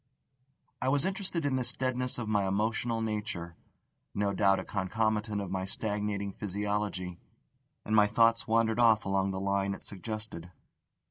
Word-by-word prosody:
I 130 Hz, -, +1 dB
was 140 Hz, +1 st, +2 dB
interested 190 Hz, -4 st, -1 dB
in 135 Hz, -2 st, +1 dB
this 125 Hz, -, -1 dB
deadness 125 Hz, -1 st, -1 dB
of 120 Hz, -2 st, -4 dB
my 105 Hz, -2 st, +2 dB
emotional 115 Hz, +3 st, 0 dB
nature 105 Hz, -6 st, -3 dB, 0.6 s
no 100 Hz, 0 st, +1 dB
doubt 100 Hz, -1 st, +4 dB
a -, -, -4 dB
concomitant 105 Hz, +2 st, -1 dB
of 100 Hz, -3 st, -4 dB
my 95 Hz, -1 st, -1 dB
stagnating 105 Hz, 0 st, -2 dB
physiology; 100 Hz, -3 st, -3 dB, 0.7 s
and 110 Hz, -, +1 dB
my 105 Hz, -1 st, +6 dB
thoughts 115 Hz, +1 st, +3 dB
wandered 115 Hz, 0 st, +2 dB
off 115 Hz, -2 st, +5 dB
along 95 Hz, 0 st, +1 dB
the 95 Hz, -1 st, -3 dB
line 100 Hz, 0 st, 0 dB
it -, -, -11 dB
suggested. 105 Hz, -4 st, -5 dB
105 Hz, 150 wpm, -30 LUFS, 100-115 Hz, 0.7 s, my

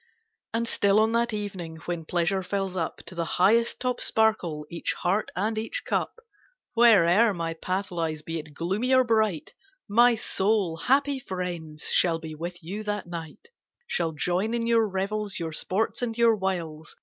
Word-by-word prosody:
And 230 Hz, +1 st, -1 dB
still 200 Hz, -2 st, +3 dB
on 220 Hz, +1 st, +3 dB
that 235 Hz, +1 st, +1 dB
evening, 190 Hz, -6 st, -5 dB
when 170 Hz, -2 st, -4 dB
pleasure 175 Hz, +3 st, 0 dB
fills 195 Hz, 0 st, -3 dB
up 165 Hz, -3 st, -2 dB
ID -, -, -29 dB
To 170 Hz, -, -9 dB
the 170 Hz, -1 st, -2 dB
highest 225 Hz, +6 st, +3 dB
top 250 Hz, -1 st, -1 dB
sparkle 185 Hz, -9 st, +1 dB
each 170 Hz, +2 st, -2 dB
heart 195 Hz, +4 st, 0 dB
and 215 Hz, +4 st, -1 dB
each 225 Hz, -, -3 dB
cup. -, -, -1 dB, 0.6 s
Where'er 220 Hz, -2 st, +5 dB
my 165 Hz, -1 st, -2 dB
path 185 Hz, +4 st, -3 dB
lies, 160 Hz, -3 st, -3 dB
be 165 Hz, +1 st, -4 dB
it 150 Hz, -1 st, -11 dB
gloomy 205 Hz, -, 0 dB
or 260 Hz, -, +6 dB
bright, 220 Hz, -8 st, 0 dB, 0.3 s
My 235 Hz, +3 st, +5 dB
soul, 200 Hz, -5 st, 0 dB
happy 275 Hz, +7 st, +2 dB
friends, 175 Hz, -7 st, -5 dB
shall 170 Hz, -2 st, +4 dB
be 160 Hz, -1 st, -8 dB
with 170 Hz, +3 st, -7 dB
you 195 Hz, +6 st, -5 dB
that 210 Hz, -1 st, -3 dB
night; 170 Hz, -, -8 dB, 0.4 s
Shall 170 Hz, -, -1 dB
join 180 Hz, +8 st, 0 dB
in 230 Hz, -1 st, -1 dB
your 230 Hz, -1 st, +3 dB
revels, 200 Hz, +1 st, -2 dB
your 165 Hz, -1 st, -3 dB
sports 195 Hz, +10 st, -1 dB
and 235 Hz, -2 st, -2 dB
your 230 Hz, -1 st, +5 dB
wiles. 170 Hz, -5 st, -4 dB
190 Hz, 175 wpm, -26 LUFS, 170-220 Hz, 0.6 s, or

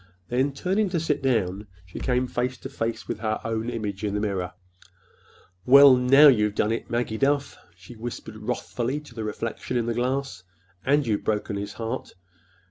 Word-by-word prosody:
Then, 130 Hz, +3 st, +1 dB
turning 190 Hz, +9 st, 0 dB
to 175 Hz, -2 st, 0 dB
sit 155 Hz, -2 st, -1 dB
down, 105 Hz, -6 st, 0 dB, 0.2 s
she 90 Hz, -, -9 dB
came 125 Hz, 0 st, +1 dB
face 125 Hz, +1 st, -2 dB
to 135 Hz, -, -8 dB
face 115 Hz, -4 st, -4 dB
with -, -, -4 dB
her 110 Hz, -1 st, -1 dB
own 115 Hz, +1 st, -2 dB
image 105 Hz, -4 st, -4 dB
in 105 Hz, -1 st, -1 dB
the -, -, 0 dB
mirror. 95 Hz, -4 st, -2 dB, 1.1 s
"Well, 140 Hz, +2 st, +8 dB
now 135 Hz, +4 st, +7 dB
you've 105 Hz, -6 st, +4 dB
done 105 Hz, -, +1 dB
it, 115 Hz, -, -3 dB
Maggie 120 Hz, -2 st, -2 dB
Duff," 140 Hz, 0 st, +1 dB, 0.2 s
she 90 Hz, +6 st, -13 dB
whispered 110 Hz, -1 st, -7 dB
wrathfully 120 Hz, +4 st, -3 dB
to 150 Hz, -5 st, -15 dB
the 115 Hz, -1 st, -5 dB
reflection 115 Hz, +3 st, -3 dB
in 120 Hz, -, 0 dB
the 120 Hz, -, -1 dB
glass. 130 Hz, -3 st, -2 dB, 0.4 s
"And 145 Hz, +1 st, +2 dB
you've 105 Hz, -3 st, -1 dB
broken 105 Hz, -1 st, -1 dB
his 100 Hz, 0 st, -5 dB
heart! 115 Hz, -1 st, -5 dB
120 Hz, 180 wpm, -25 LUFS, 110-135 Hz, 1.1 s, Well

